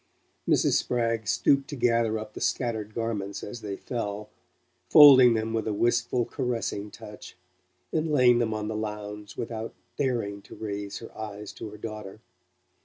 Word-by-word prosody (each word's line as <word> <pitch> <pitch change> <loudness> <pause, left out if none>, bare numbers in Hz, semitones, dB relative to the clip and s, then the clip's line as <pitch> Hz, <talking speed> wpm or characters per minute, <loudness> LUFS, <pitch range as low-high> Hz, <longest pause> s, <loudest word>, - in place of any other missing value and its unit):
Mrs. - - +3
Spragg 115 -3 -1
stooped 140 +5 +2
to 145 - -6
gather 115 -3 +2
up 110 0 -7
the - - -8
scattered 110 -4 -1
garments 100 -4 -3
as 115 +3 -7
they 100 -2 -4
fell, 105 -2 -5 0.6
folding 130 -6 +9
them 110 0 -2
with 110 -1 -1
a 110 - 0
wistful 120 +2 +1
caressing 115 -5 -3
touch, 105 0 -11 0.6
and 160 0 0
laying 125 -4 +5
them 115 -2 0
on 105 -1 -3
the 110 - -3
lounge, 105 -1 -6
without 115 -1 -5 0.2
daring 115 -7 -1
to - - -13
raise 100 -2 -5
her 115 - -11
eyes 105 -1 -7
to - - -8
her 105 - -11
daughter. 105 -2 -7
110 Hz, 160 wpm, -27 LUFS, 105-120 Hz, 0.6 s, folding